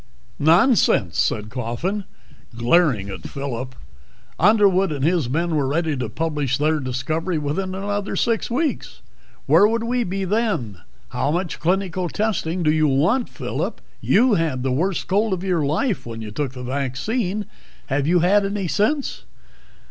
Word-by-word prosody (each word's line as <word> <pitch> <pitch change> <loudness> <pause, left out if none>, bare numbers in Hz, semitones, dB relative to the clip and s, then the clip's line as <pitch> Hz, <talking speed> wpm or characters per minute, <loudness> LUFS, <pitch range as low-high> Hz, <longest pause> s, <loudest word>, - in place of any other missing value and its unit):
"Nonsense," 175 - +3
said 105 0 0
Coffin, 130 - -3 0.5
glaring 120 - +2
at 95 -3 -7
Phillip. 130 -2 -5 0.6
"Underwood 195 -2 +4
and 140 -2 -1
his 165 -7 +1
men 165 +4 0
were 140 -3 +1
ready 160 +2 0
to 125 -4 -3
publish 145 0 -1
their 155 +1 +1
discovery 150 +7 -2
within 170 +6 -2
another 205 +1 -3
six 230 -2 0
weeks. 290 +6 -2 0.4
Where 205 - +6
would 230 +1 -1
we 245 +1 0
be 195 -1 -3
then? 190 - -1 0.3
How - - -1
much 175 +2 -2
clinical 185 0 0
testing 185 -5 -1
do 155 - +3
you 155 0 +3
want? 165 - +2
Phillip, - - -4 0.2
you 240 +3 +4
had 160 -8 0
the 130 - 0
worst 170 +8 -1
cold 205 +2 +1
of 185 -1 -3
your 180 -5 +1
life 165 - 0
when 115 -1 -7
you 110 -1 -6
took 135 +3 -3
the 125 -1 -8
vaccine. 175 - -2 0.4
Have 140 0 -1
you 175 +1 +3
had 200 +4 +4
any 195 -1 -2
since?" 220 - -1
165 Hz, 155 wpm, -22 LUFS, 135-200 Hz, 0.6 s, Where